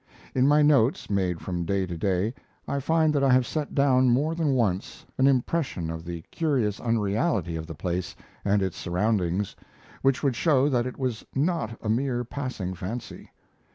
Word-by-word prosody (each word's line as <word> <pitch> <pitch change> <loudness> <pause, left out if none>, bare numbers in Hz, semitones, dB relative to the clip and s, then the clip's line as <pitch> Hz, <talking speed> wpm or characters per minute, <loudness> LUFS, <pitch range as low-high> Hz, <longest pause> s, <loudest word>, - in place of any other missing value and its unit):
In 130 +1 +3
my 150 +1 +5
notes, 140 -6 +3
made 90 -4 0
from 90 -2 -3
day 95 +2 0
to 90 -1 -5
day, 95 +5 0 0.3
I 140 - -1
find 160 +2 +2
that 140 -2 +1
I 135 - +4
have 125 0 +4
set 150 +1 -3
down 130 -2 +4
more 145 +7 +2
than 160 -4 +1
once 100 -6 -1
an 130 - +5
impression 130 - 0
of 80 +1 -7
the 85 -1 -6
curious 130 -11 0
unreality 110 - 0
of 80 0 -5
the 80 - -7
place 90 +3 -3 0.3
and 100 0 +2
its 95 -3 -3
surroundings, 95 0 0 0.5
which 135 +2 +2
would 135 -4 +2
show 140 0 +3
that 125 -3 +1
it 125 - -7
was 125 -5 -2
not 135 -6 0
a 110 - -2
mere 120 +1 0
passing 120 -7 -4
fancy. 100 +7 -7
120 Hz, 180 wpm, -26 LUFS, 95-140 Hz, 0.5 s, my